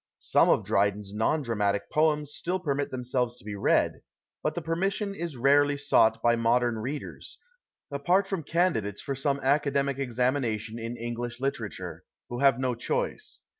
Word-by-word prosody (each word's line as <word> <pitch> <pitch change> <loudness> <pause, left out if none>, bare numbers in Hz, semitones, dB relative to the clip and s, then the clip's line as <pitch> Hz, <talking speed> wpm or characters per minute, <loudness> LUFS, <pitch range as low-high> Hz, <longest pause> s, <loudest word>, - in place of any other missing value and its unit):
Some - - +3
of - - +3
Drydens 100 0 0
non 130 +8 +1
dramatic 100 -4 -1
poems 150 -1 +2
still 180 +2 -2
permit 145 -4 -1
themselves 125 -1 -2
to - - -13
be 105 - -5
read, 100 - +1 0.4
but 155 - -1
the 175 - -2
permission 195 +5 -1
is 170 -7 -5
rarely 145 +3 +4
sought 110 -5 +3
by 120 0 +4
modern 120 0 +2
readers, 140 +6 -6 0.5
apart 175 +8 +2
from 195 -3 -3
candidates 150 - 0
for 140 - -3
some 140 +1 0
academic 140 0 +1
examination 120 -3 -1
in 115 +1 -5
English 120 +1 -5
literature, 135 +1 -4 0.3
who 120 - -4
have 135 -2 +5
no 130 -1 0
choice. 120 - -3
130 Hz, 155 wpm, -28 LUFS, 115-150 Hz, 0.5 s, have